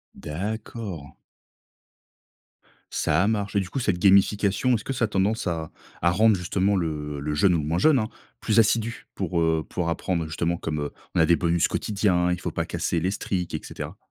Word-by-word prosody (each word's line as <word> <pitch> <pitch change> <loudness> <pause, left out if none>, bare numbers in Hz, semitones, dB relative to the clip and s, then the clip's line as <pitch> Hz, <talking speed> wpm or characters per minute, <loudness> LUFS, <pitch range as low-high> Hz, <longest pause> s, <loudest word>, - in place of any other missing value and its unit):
D'accord. 95 - -5 1.8
Ça - - +1
a - - +2
marché. 105 -2 0
Du 90 -2 -3
coup, 135 - -3
cette 105 -7 0
gamification 100 +4 +4
est-ce 105 - -3
que 135 - -2
ça 120 -2 +1
a - - -2
tendance 105 +1 0
à 80 -2 -3 0.3
à 85 - +4
rendre 110 +2 +4
justement 95 +3 0
le 75 -4 -3
le 75 +1 -3
jeune, 90 +4 +4
ou 80 - +1
moins 80 +4 -1
jeune, 150 0 +5
hein, 110 - -1 0.3
plus 110 0 +2
assidu? 115 +1 +1
Pour, 85 -1 -1
heu, 80 -1 +1
pour 85 -2 -2
apprendre 85 0 -1
justement 85 +2 -1
comme, 75 -2 -3
heu, 75 - -3 0.2
on - - +3
a 80 - +6
des 85 +1 +5
bonus 85 -1 +2
quotidiens, 95 -4 +1
il 90 - -1
faut - - -4
pas - - -2
casser 85 - -1
les 95 +2 0
streak, 90 -4 -3
et - - -1
cetera. - - -7
90 Hz, 195 wpm, -25 LUFS, 85-105 Hz, 1.8 s, a